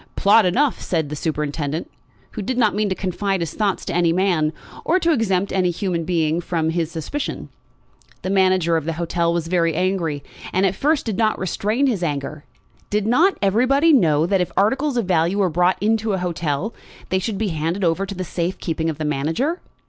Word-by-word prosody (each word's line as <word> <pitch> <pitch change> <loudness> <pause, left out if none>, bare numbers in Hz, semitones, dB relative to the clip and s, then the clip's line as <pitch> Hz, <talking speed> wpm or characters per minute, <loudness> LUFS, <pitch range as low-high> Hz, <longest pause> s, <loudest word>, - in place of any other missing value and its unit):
"Plot 205 0 +5
enough," 265 +9 +1
said 160 -5 -1
the 150 - -4
superintendent, 150 0 -3 0.4
who 215 - -5
did 245 +5 -3
not 220 -4 +3
mean 210 0 0
to 190 - -1
confide 195 +1 -1
his 165 -2 -3
thoughts 205 -3 -1
to - - -3
any 170 -1 +3
man, 170 -4 +1 0.3
or 350 - +2
to 340 -2 +2
exempt 200 - +1
any 185 -2 +2
human 175 -2 -2
being 165 -1 0
from 160 -2 -1
his 165 -2 -1
suspicion. 170 - -5 0.7
The 185 - -2
manager 185 -4 +3
of 160 - -3
the 165 - -1
hotel 170 +1 0
was 170 -1 -1
very 165 -2 +1
angry, 175 -5 -1 0.3
and 185 +2 +2
at 190 - +2
first 295 +8 +1
did 220 -4 -2
not 220 -1 +2
restrain 210 +7 0
his 230 -9 0
anger. 145 -2 -3 0.4
Did 210 0 0
not 320 - +3
everybody 260 - +3
know 160 - +4
that 190 +1 +1
if 180 - -2
articles 265 +7 +1
of 235 - +1
value 175 +1 +1
were 190 -4 +2
brought 180 +3 +2
into 220 +1 +1
an 190 - -1
hotel 170 +2 -2 0.4
they 185 - +1
should 200 +2 -3
be 215 0 -1
handed 165 +4 -2
over 180 +3 +1
to 195 - -6
the 185 - -3
safe 175 +1 -3
keeping 165 -1 -2
of 155 - -4
the 155 - -3
manager? 160 - -1
185 Hz, 200 wpm, -21 LUFS, 165-210 Hz, 0.7 s, Plot